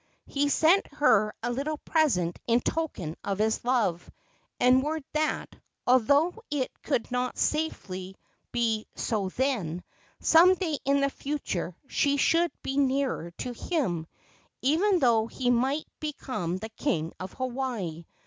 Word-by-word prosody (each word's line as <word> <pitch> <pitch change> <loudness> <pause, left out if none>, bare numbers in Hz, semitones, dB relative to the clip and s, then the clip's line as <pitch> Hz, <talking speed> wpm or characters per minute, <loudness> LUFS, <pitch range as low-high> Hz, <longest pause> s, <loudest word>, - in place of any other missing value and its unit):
He 285 0 0
sent 330 +7 +4
her 215 -8 +4
a 240 - 0
little 285 +5 -2
present 240 - +1
in 235 +1 +3
token 210 - -2
of 200 -1 -2
his 220 +1 +1
love, 230 -9 0 0.5
and 255 +1 +5
word 305 +2 -2
that, 310 0 -1 0.3
although 285 - +3
it 285 -4 -1
could 250 -5 -1
not 250 0 -1
safely 190 -12 -2 0.4
be 225 -3 0
so 205 -4 -1
then, 190 - -1 0.4
some 350 +3 +6
day 325 -6 -2
in 280 +1 +3
the 275 0 +2
future 270 - -3
she 285 +1 +1
should 335 +4 +3
be 270 - -3
nearer 270 - +1
to 250 - -4
him, 225 - -2 0.6
even 355 +9 +3
though 235 -7 +3
he 245 +1 0
might 265 +5 +1
become 255 - -3
the 220 +3 -6
king 220 - -2
of 185 +1 -6
Hawaii. 240 -11 -3
255 Hz, 140 wpm, -28 LUFS, 215-295 Hz, 0.6 s, some